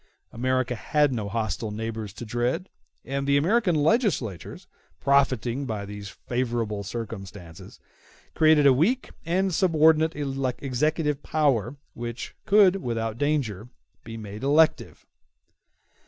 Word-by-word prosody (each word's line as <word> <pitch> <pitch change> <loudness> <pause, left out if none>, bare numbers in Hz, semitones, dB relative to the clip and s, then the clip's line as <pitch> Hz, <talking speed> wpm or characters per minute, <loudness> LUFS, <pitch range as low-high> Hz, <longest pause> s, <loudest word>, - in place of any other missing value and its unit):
America 130 +1 0
had 145 +4 +1
no 105 -4 -3
hostile 110 +1 -2
neighbors 110 0 -5
to 120 - -9
dread; 120 - -2 0.4
and 140 +1 -3
the 140 0 +4
American 185 +4 +2
legislators, 150 - 0 0.3
profiting 135 -1 +1
by 105 -3 -4
these 100 0 -8
favorable 115 -3 -3
circumstances, 100 -5 -8 0.5
created 155 -2 +4
a 140 - +7
weak 210 - +1 0.2
and 185 +2 +1
subordinate 160 -2 +3
executive 140 +2 -1
power 140 -6 0 0.2
which 120 +1 -6
could 200 -2 +5
without 115 - -3
danger 125 -8 -1 0.3
be 115 0 -8
made 105 -1 -8
elective. 150 +3 +2
130 Hz, 110 wpm, -25 LUFS, 115-155 Hz, 0.5 s, a